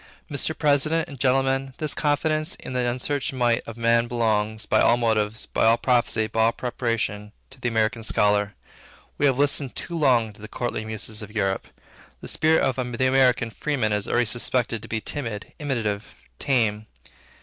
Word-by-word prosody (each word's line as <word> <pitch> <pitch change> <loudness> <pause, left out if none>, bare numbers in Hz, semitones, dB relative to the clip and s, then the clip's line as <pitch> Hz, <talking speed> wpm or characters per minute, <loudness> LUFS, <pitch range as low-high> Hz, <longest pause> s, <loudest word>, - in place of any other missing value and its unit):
Mr. 145 +2 -1
President 155 +2 +2
and 140 -3 -10
Gentlemen, 135 0 +1
this 155 -2 -1
confidence 155 +1 0
in - - -8
the 125 -1 +1
unsearched 135 +3 -2
might 120 -3 +2
of 115 - -8
man 115 0 +3
belongs, 110 -2 0
by 110 - +3
all 120 - +5
motives, 110 -2 0
by - - -1
all 115 +1 +5
prophecy, 115 -3 +2
by 110 +1 +1
all 115 - +4
preparation, 115 -4 -3 0.2
to 135 -1 -12
the 120 - -1
American 115 0 0
Scholar. 105 -1 +1 0.6
We 145 - +4
have 130 -2 +2
listened 140 -2 0
too 170 - -4
long 125 -8 +2
to 100 - -17
the 110 - -8
courtly 120 -2 -3
muses 110 0 -5
of 105 - -8
Europe. 95 -3 -1 0.5
The - - -9
spirit 160 0 +2
of 130 -1 0
the 125 0 0
American 130 -3 +3
freeman 125 -6 -1
is 105 -1 -1
already 120 0 +2
suspected 120 0 0
to - - -10
be 110 -1 -3
timid, 115 -8 -5
imitative, 115 -8 -3 0.2
tame. 110 -5 +1
120 Hz, 175 wpm, -24 LUFS, 110-135 Hz, 0.6 s, all